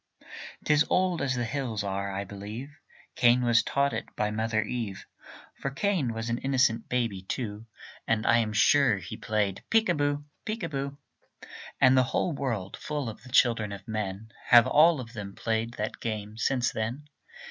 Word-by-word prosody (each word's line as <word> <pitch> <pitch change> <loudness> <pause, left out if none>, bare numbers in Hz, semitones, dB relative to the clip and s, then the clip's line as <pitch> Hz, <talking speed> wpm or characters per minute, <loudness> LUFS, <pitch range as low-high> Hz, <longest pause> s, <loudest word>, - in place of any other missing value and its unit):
'Tis 150 0 +4
old 185 -2 +2
as 135 -2 0
the 120 -1 -1
hills 115 -4 -3
are. 100 0 -2
I 95 +1 -3
believe 105 +8 -8 0.4
Cain 120 +1 +4
was 120 -1 +4
taught 140 -1 0
it 110 - -4
by 105 0 0
Mother 110 0 0
Eve; 110 -4 -4 0.5
For 135 - -4
Cain 150 - 0
was 115 0 -4
an 120 +1 -1
innocent 130 -4 +1
baby, 115 -6 -1
too, 105 +2 -5 0.4
And 110 -1 +1
I 115 - +5
am 110 -2 0
sure 120 +1 +4
he 95 -1 -7
played 105 -3 -1
peek 225 -3 +3
a - - +4
boo, 145 -1 -1 0.2
peek 220 +1 -4
a 165 - -2
boo. 140 0 -4 0.8
And 130 +1 +6
the 130 - +6
whole 175 - 0
world 115 -9 -3
full 145 -5 -3
of 110 - -10
the 130 - -13
children 115 -5 +3
of 100 +2 -9
men, 110 0 -4 0.2
Have 120 -2 +8
all 160 0 +5
of 115 -2 -8
them 100 -3 -7
played 115 +1 -1
that 105 +1 -4
game 110 -2 -4
since 120 +1 +1
then. 120 +7 -4
115 Hz, 180 wpm, -28 LUFS, 105-140 Hz, 0.8 s, Have